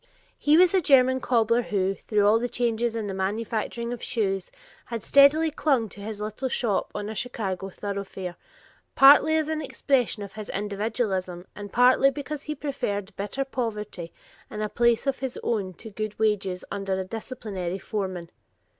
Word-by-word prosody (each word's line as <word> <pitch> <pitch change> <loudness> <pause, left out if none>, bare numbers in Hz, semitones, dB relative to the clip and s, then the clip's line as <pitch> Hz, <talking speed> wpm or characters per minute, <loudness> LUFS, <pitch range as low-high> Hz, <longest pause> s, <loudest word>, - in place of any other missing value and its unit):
He 300 +2 +4
was 360 +1 +6
a 380 - +4
German 260 -3 +5
cobbler 235 -2 +2
who, 195 -4 0
through 205 +1 0
all 215 +2 +5
the 245 +1 -2
changes 235 -1 0
in 225 -2 -2
the 200 - -4
manufacturing 220 +4 -2
of 245 - -7
shoes, 195 -6 -1 0.4
had 230 -4 -5
steadily 295 +3 +5
clung 270 -7 +1
to 200 - -11
his 210 0 -6
little 215 +5 -3
shop 230 -5 -1
on 205 - -3
a 220 - -4
Chicago 195 -4 -3
thoroughfare, 195 -2 -5 0.6
partly 290 +3 +7
as 310 -1 0
an 315 0 -2
expression 260 -6 0
of 200 - -9
his 215 -1 -7
individualism 200 -3 -2
and 205 -1 -8
partly 255 +3 +5
because 290 +1 -5
he 305 0 -4
preferred 215 -8 -3
bitter 210 +7 -3
poverty 210 -9 -4 0.4
in 215 0 -4
a 210 - -2
place 235 +1 +2
of 275 -1 0
his 265 -2 -4
own 195 -5 -1
to 220 +5 -10
good 215 +1 -4
wages 200 -4 0
under 195 -1 -2
a - - -1
disciplinary 195 -3 -5
foreman. 185 -5 -4
220 Hz, 170 wpm, -26 LUFS, 200-255 Hz, 0.6 s, partly